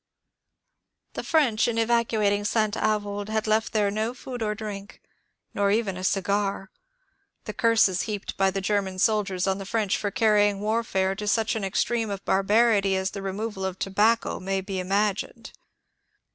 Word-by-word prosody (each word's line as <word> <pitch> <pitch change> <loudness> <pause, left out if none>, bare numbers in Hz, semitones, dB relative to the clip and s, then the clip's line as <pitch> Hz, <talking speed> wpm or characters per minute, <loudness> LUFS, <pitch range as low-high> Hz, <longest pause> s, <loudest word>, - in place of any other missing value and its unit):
The - - -5
French 265 -10 +2
in 230 -1 -1
evacuating 225 -3 +1
St. 215 0 0
Avoid 205 -1 -1
had 220 0 -1
left 215 +1 +1
there 205 -2 +1
no 220 +4 -2
food 250 -1 -7
or 210 -1 -1
drink, 205 -2 -7 0.5
nor 200 0 +1
even 205 -2 0
a 185 - -7
cigar. 200 +1 -1 0.7
The - - -6
curses 220 -5 +3
heaped 205 -2 -4
by 195 0 +2
the 195 0 -3
Grer 205 +1 +1
man 190 -1 -7
soldiers 195 -2 +1
on 190 0 0
the - - -5
French 205 0 0
for 205 - -2
carrying 205 -2 +2
warfare 210 -3 0
to 210 +2 -6
such 220 +2 +1
an 220 - -3
extreme 225 +3 0
of 195 -1 -5
barbarity 200 0 +3
as 190 0 -1
the 200 - -6
removal 195 +1 -4
of 190 -1 -3
tobacco 210 +5 +1
may 195 +1 -2
be 190 0 -4
im 185 0 -5
agined. 205 0 -1
205 Hz, 170 wpm, -25 LUFS, 195-220 Hz, 0.7 s, curses